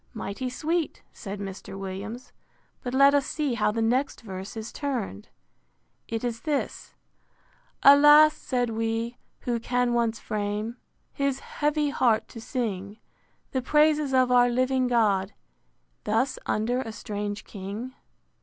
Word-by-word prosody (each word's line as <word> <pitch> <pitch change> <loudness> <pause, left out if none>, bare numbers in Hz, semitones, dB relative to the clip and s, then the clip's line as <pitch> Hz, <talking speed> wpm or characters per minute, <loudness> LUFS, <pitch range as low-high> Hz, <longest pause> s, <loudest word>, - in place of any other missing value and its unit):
Mighty 220 +4 -4
sweet, 320 +6 -2
said 200 0 -7
Mr. 195 0 -7
Williams. 195 +6 -6 0.5
But 245 0 -4
let 275 +1 +6
us 285 -1 +2
see 295 -5 -1
how 215 -3 +1
the 225 +1 -1
next 255 +5 0
verse 195 0 -7
is 220 0 -6
turned. 240 - -4 0.8
It 225 0 -3
is 235 -1 -3
this: 295 -3 -3
IV. - - -38
Alas! 295 +2 +8
said 245 -3 -1
we; 225 +1 -2 0.2
who 240 -1 -1
can 245 +1 0
once 235 -1 +1
frame 210 +3 -3 0.4
His 275 -1 -1
heavy 295 -1 0
heart 225 -6 +2
to 230 - -9
sing 210 -5 -3 0.5
The 260 - 0
praises 300 +1 +3
of 255 -1 +3
our 245 0 +5
living 255 +1 +1
God, 210 -5 +2 0.7
Thus 230 +5 0
under 240 +4 0
a 225 - -5
strange 205 -1 -5
king? 205 +6 -7
240 Hz, 135 wpm, -26 LUFS, 215-265 Hz, 0.8 s, Alas